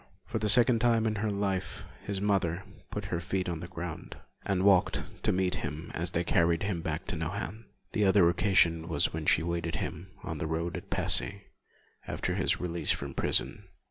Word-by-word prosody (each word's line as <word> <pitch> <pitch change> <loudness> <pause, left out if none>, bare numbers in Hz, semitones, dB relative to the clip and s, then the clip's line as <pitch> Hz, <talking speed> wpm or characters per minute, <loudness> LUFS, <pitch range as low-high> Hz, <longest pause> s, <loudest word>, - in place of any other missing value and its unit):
For 115 - -3
the 105 0 +1
second 120 +1 +6
time 115 -1 +3
in 110 -1 0
her 110 +1 -1
life, 100 -2 -2 0.2
his 100 -1 -3
mother 95 -4 0 0.3
put - - -5
her 85 - +1
feet 95 +1 -2
on 85 -3 -3
the 85 - -7
ground, 85 -2 -7 0.3
and 95 -1 0
walked 95 -2 +4 0.2
to - - +2
meet 90 0 +1
him 75 +3 -5
as 85 +1 0
they 85 0 0
carried 85 0 +2
him 95 -4 -1
back - - -3
to - - -4
Nohant. 110 +5 -4 0.3
The 105 - +1
other 95 -2 +5
occasion 85 -2 +3
was 85 - +2
when 80 -1 -4
she - - +4
awaited 85 0 -2
him 85 +3 -4 0.2
on - - -5
the - - -2
road 85 +2 -2
at 95 +2 -7
Passy, 95 +2 +1 0.6
after - - -2
his - - +1
release 85 -1 -1
from 70 -1 0
prison. - - +1
90 Hz, 195 wpm, -30 LUFS, 85-100 Hz, 0.6 s, second